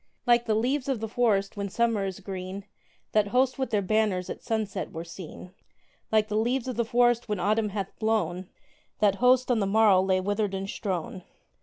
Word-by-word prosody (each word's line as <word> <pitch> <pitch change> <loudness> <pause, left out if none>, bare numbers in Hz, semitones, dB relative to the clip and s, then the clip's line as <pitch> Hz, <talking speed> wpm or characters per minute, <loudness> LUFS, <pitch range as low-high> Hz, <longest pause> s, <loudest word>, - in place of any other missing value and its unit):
Like 240 -1 +4
the 215 - +2
leaves 255 +5 0
of 260 -4 0
the 225 - -3
forest 210 -4 +1
when 200 -1 -3
Summer 230 -1 +1
is 190 +1 -6
green, 190 0 -6 0.5
That 215 -1 +3
host 255 +4 +1
with 265 - -1
their 210 -3 +1
banners 205 -2 0
at - - -7
sunset 220 -3 -3
were 165 0 -6
seen: 175 +1 -10 0.6
Like 215 -1 +3
the 210 - -3
leaves 245 +3 0
of 255 - -3
the 235 - +1
forest 240 0 +2
when 210 -3 -1
Autumn 215 +2 +1
hath 195 -1 -5
blown, 185 -5 -1 0.5
That 200 -2 +2
host 255 0 +4
on 235 - +2
the 200 - 0
morrow 205 -2 +5
lay 190 0 +2
withered 205 +1 -1
and 195 0 -4
strown. 190 -2 -4
210 Hz, 195 wpm, -27 LUFS, 195-235 Hz, 0.6 s, morrow